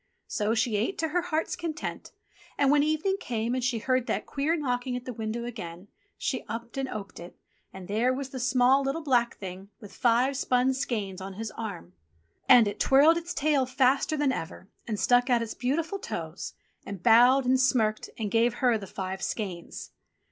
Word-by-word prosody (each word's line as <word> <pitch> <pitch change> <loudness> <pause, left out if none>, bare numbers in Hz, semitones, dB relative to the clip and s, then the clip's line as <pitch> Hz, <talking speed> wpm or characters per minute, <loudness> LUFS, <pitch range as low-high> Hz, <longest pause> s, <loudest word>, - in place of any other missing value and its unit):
So 210 +2 -1
she 225 -1 +1
ate 225 - -1
to 320 - -1
her 355 +3 +1
heart's 325 -2 -2
content, 335 -2 -5 0.5
and 280 -1 +3
when 290 0 +5
evening 310 +6 +1
came 235 -3 -2
and 255 -1 -1
she 245 -1 +1
heard 255 +2 0
that - - -1
queer 295 +4 0
knocking 250 -4 -2
at 250 0 -6
the 250 - -5
window 225 +1 -4
again, 185 -6 -8 0.3
she - - -2
upped 230 +1 -6
and 270 -1 -2
oped 200 -2 -7
it, 175 +1 -11 0.3
and 190 -2 -10
there 225 +5 +1
was 265 +1 -4
the 260 - -6
small, 250 +2 +4
little, 275 +4 -2
black 245 -5 +1
Thing 190 0 -8
with 205 - -12
five 250 +3 +2
spun 255 0 +2
skeins 210 -8 -3
on 195 +1 -6
his 220 +2 -5
arm! 200 - -7 0.6
And 245 -4 +8
it 205 - -4
twirled 285 +5 +5
its 340 +1 -5
tail 285 -3 +2
faster 265 +4 +2
than 290 -2 +2
ever, 185 -3 -6 0.2
and 215 -3 -2
stuck 245 +1 +3
out 240 -2 +3
its 225 - -5
beautiful 325 +10 -2
toes, - - -6 0.3
and 200 -3 -8
bowed 245 +3 +6
and 260 +1 +3
smirked 225 -4 +1
and 215 -3 -3
gave 230 +1 +2
her 240 -3 +2
the 195 - -8
five 190 0 -5
skeins. 185 -7 -5
245 Hz, 190 wpm, -27 LUFS, 215-270 Hz, 0.6 s, And